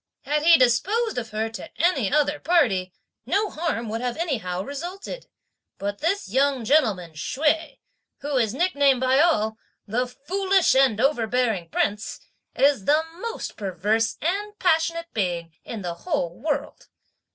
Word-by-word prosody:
Had 300 Hz, +1 st, 0 dB
he 330 Hz, +1 st, +7 dB
disposed 380 Hz, -, +2 dB
of 225 Hz, -2 st, -7 dB
her 215 Hz, +1 st, -2 dB
to 220 Hz, -, -8 dB
any 295 Hz, -, +2 dB
other 295 Hz, 0 st, +2 dB
party, 225 Hz, -, +2 dB, 0.4 s
no 410 Hz, +1 st, +1 dB
harm 310 Hz, -8 st, -2 dB
would 225 Hz, +2 st, -3 dB
anyhow 245 Hz, -, -2 dB
have 190 Hz, -, -3 dB
resulted; 360 Hz, -, -7 dB, 0.5 s
but 200 Hz, 0 st, -4 dB
this 375 Hz, +6 st, 0 dB
young 265 Hz, +2 st, +1 dB
gentleman 215 Hz, -, +2 dB
Hsüeh, 300 Hz, -, -1 dB, 0.4 s
who 290 Hz, 0 st, -3 dB
is 230 Hz, -2 st, +1 dB
nicknamed 285 Hz, -6 st, +3 dB
by 260 Hz, +1 st, +3 dB
all, 220 Hz, -10 st, +2 dB, 0.3 s
'the 245 Hz, +4 st, -1 dB
Foolish 375 Hz, +8 st, +1 dB
and 265 Hz, -5 st, +3 dB
overbearing 235 Hz, -, +1 dB
Prince,' 205 Hz, +5 st, -1 dB, 0.4 s
is 275 Hz, -8 st, +3 dB
the 305 Hz, +2 st, +4 dB, 0.2 s
most 465 Hz, +3 st, -5 dB
perverse 210 Hz, +3 st, 0 dB
and 410 Hz, +5 st, -2 dB
passionate 335 Hz, -1 st, +1 dB
being 175 Hz, -5 st, -2 dB
in 220 Hz, -4 st, -6 dB
the 175 Hz, -1 st, -3 dB
whole 175 Hz, -, -2 dB
world. 295 Hz, -, -3 dB
270 Hz, 140 wpm, -24 LUFS, 215-330 Hz, 0.5 s, he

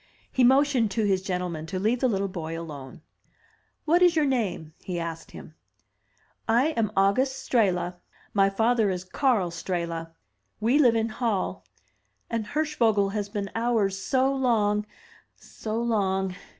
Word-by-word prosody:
He 260 Hz, -, +2 dB
motioned 265 Hz, -2 st, +4 dB
to 220 Hz, -, +2 dB
his 190 Hz, -2 st, +2 dB
gentlemen 180 Hz, -4 st, -3 dB
to 185 Hz, -, -4 dB
leave 220 Hz, +6 st, +1 dB
the 260 Hz, -, +2 dB
little 200 Hz, -4 st, 0 dB
boy 165 Hz, -3 st, -5 dB
alone. 145 Hz, -4 st, -9 dB, 0.8 s
"What 340 Hz, +3 st, +3 dB
is 350 Hz, -2 st, +5 dB
your 310 Hz, -2 st, +3 dB
name?*' 205 Hz, -, -1 dB
he 180 Hz, -2 st, -4 dB
asked 165 Hz, -1 st, -5 dB
him. -, -, -11 dB, 1.0 s
"I 245 Hz, +7 st, +4 dB
am 230 Hz, -9 st, -1 dB
August 255 Hz, +8 st, +1 dB
Strehla. 180 Hz, -6 st, +1 dB, 0.4 s
My 195 Hz, -1 st, +4 dB
father 225 Hz, +1 st, +2 dB
is 180 Hz, -1 st, -3 dB
Karl 200 Hz, -3 st, +1 dB
Strehla. 170 Hz, -1 st, -4 dB, 0.5 s
We 240 Hz, +7 st, +3 dB
live 245 Hz, -6 st, +5 dB
in 225 Hz, 0 st, 0 dB
Hall; 215 Hz, -3 st, -2 dB, 0.7 s
and 225 Hz, -2 st, -2 dB
Hirschvogel 230 Hz, -9 st, +1 dB
has 205 Hz, -1 st, -3 dB
been 200 Hz, -2 st, -4 dB
ours 220 Hz, -4 st, 0 dB
so 265 Hz, +1 st, +2 dB
long, 210 Hz, -5 st, +1 dB, 0.3 s
— -, -, -38 dB
so 220 Hz, +1 st, -5 dB
long!' 195 Hz, -5 st, 0 dB
210 Hz, 150 wpm, -26 LUFS, 185-245 Hz, 1.0 s, is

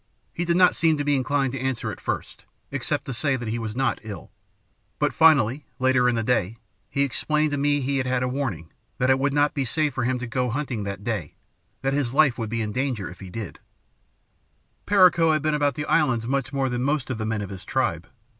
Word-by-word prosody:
he 175 Hz, -, -2 dB
did 170 Hz, 0 st, +2 dB
not 180 Hz, -1 st, +5 dB
seem 160 Hz, -2 st, +3 dB
to 145 Hz, -, -1 dB
be 145 Hz, 0 st, +2 dB
inclined 135 Hz, 0 st, 0 dB
to 135 Hz, -, -3 dB
answer 130 Hz, -2 st, -2 dB
at -, -, -10 dB
first, -, -, -4 dB, 0.3 s
except -, -, -2 dB
to 135 Hz, -, -4 dB
say 140 Hz, +3 st, +1 dB
that 120 Hz, -3 st, -4 dB
he 115 Hz, +2 st, -2 dB
was 110 Hz, -1 st, -5 dB
not 135 Hz, -1 st, 0 dB
ill; 105 Hz, -3 st, -9 dB, 0.7 s
but 150 Hz, -, +1 dB
finally, 150 Hz, -4 st, +4 dB
later 130 Hz, -1 st, +3 dB
in 120 Hz, -, 0 dB
the 115 Hz, -, 0 dB
day, 115 Hz, -3 st, 0 dB, 0.3 s
he 140 Hz, -, +1 dB
explained 150 Hz, +3 st, 0 dB
to 145 Hz, -, -1 dB
me 145 Hz, +1 st, +2 dB
that 140 Hz, -, -3 dB
he 140 Hz, +1 st, 0 dB
had 130 Hz, -1 st, -1 dB
had 130 Hz, -1 st, 0 dB
a -, -, 0 dB
'warning' 125 Hz, -, -3 dB, 0.3 s
that 125 Hz, +1 st, +2 dB
it 130 Hz, -, +3 dB
would 140 Hz, +1 st, +1 dB
not 145 Hz, +1 st, +2 dB
be 140 Hz, -, -1 dB
safe 150 Hz, +2 st, 0 dB
for 130 Hz, -, -2 dB
him 125 Hz, +1 st, 0 dB
to 125 Hz, -, -5 dB
go 125 Hz, +1 st, -1 dB
hunting 130 Hz, -3 st, -3 dB
that 100 Hz, 0 st, -5 dB
day; 100 Hz, -10 st, -3 dB, 0.5 s
that 135 Hz, 0 st, +1 dB
his 135 Hz, -3 st, -1 dB
life 140 Hz, -5 st, +5 dB
would 110 Hz, -2 st, -3 dB
be 115 Hz, 0 st, -1 dB
in 105 Hz, -, -3 dB
danger 125 Hz, -5 st, -2 dB
if 90 Hz, -, -13 dB
he 95 Hz, -, -9 dB
did 105 Hz, 0 st, -7 dB
go. -, -, -36 dB, 1.3 s
"Perico 175 Hz, -5 st, +5 dB
had 155 Hz, -2 st, 0 dB
been 155 Hz, 0 st, +1 dB
about 145 Hz, -1 st, +1 dB
the 150 Hz, -, -3 dB
islands 130 Hz, -10 st, +2 dB
much 135 Hz, 0 st, -1 dB
more 135 Hz, -1 st, 0 dB
than 125 Hz, -1 st, -2 dB
most 140 Hz, 0 st, 0 dB
of 120 Hz, -, -4 dB
the -, -, -2 dB
men 110 Hz, -2 st, -1 dB
of 100 Hz, -, -7 dB
his 95 Hz, -2 st, -8 dB
tribe. -, -, -1 dB
130 Hz, 245 wpm, -24 LUFS, 115-145 Hz, 1.3 s, not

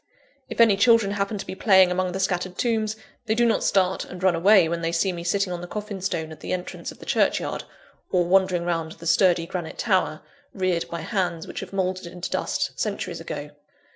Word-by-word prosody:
If -, -, -7 dB
any 225 Hz, -4 st, +6 dB
children 225 Hz, -1 st, +4 dB
happen 200 Hz, +1 st, -1 dB
to 195 Hz, -, -6 dB
be -, -, -6 dB
playing 190 Hz, -2 st, +5 dB
among 185 Hz, 0 st, 0 dB
the 190 Hz, -, -4 dB
scattered 185 Hz, -1 st, -1 dB
tombs, 220 Hz, -3 st, 0 dB, 0.3 s
they 220 Hz, -, +2 dB
do 240 Hz, +1 st, +3 dB
not 230 Hz, -, +2 dB
start 190 Hz, -1 st, +2 dB
and 180 Hz, 0 st, -9 dB
run 185 Hz, -2 st, +4 dB
away, 185 Hz, +1 st, +5 dB
when 170 Hz, +1 st, -2 dB
they 165 Hz, 0 st, -1 dB
see 170 Hz, +3 st, +1 dB
me 170 Hz, -1 st, -6 dB
sitting 185 Hz, +1 st, 0 dB
on 175 Hz, -, -5 dB
the 175 Hz, -, -7 dB
coffin 205 Hz, -1 st, -6 dB
stone 160 Hz, -4 st, -2 dB
at 160 Hz, -, -10 dB
the -, -, -4 dB
entrance 180 Hz, 0 st, -5 dB
of -, -, -14 dB
the -, -, -12 dB
churchyard, -, -, 0 dB, 0.5 s
or 180 Hz, -2 st, +3 dB
wandering 180 Hz, -1 st, +2 dB
round 165 Hz, -2 st, -2 dB
the 170 Hz, -, -13 dB
sturdy 175 Hz, 0 st, +3 dB
granite 170 Hz, -2 st, -5 dB
tower, 185 Hz, -7 st, +1 dB, 0.3 s
reared 185 Hz, -3 st, 0 dB
by 170 Hz, -1 st, -4 dB
hands 180 Hz, -6 st, -2 dB
which -, -, -6 dB
have -, -, -7 dB
mouldered 185 Hz, -2 st, -2 dB
into 175 Hz, +1 st, -6 dB
dust -, -, -1 dB
centuries -, -, -3 dB
ago. -, -, -6 dB
185 Hz, 215 wpm, -24 LUFS, 175-200 Hz, 0.5 s, any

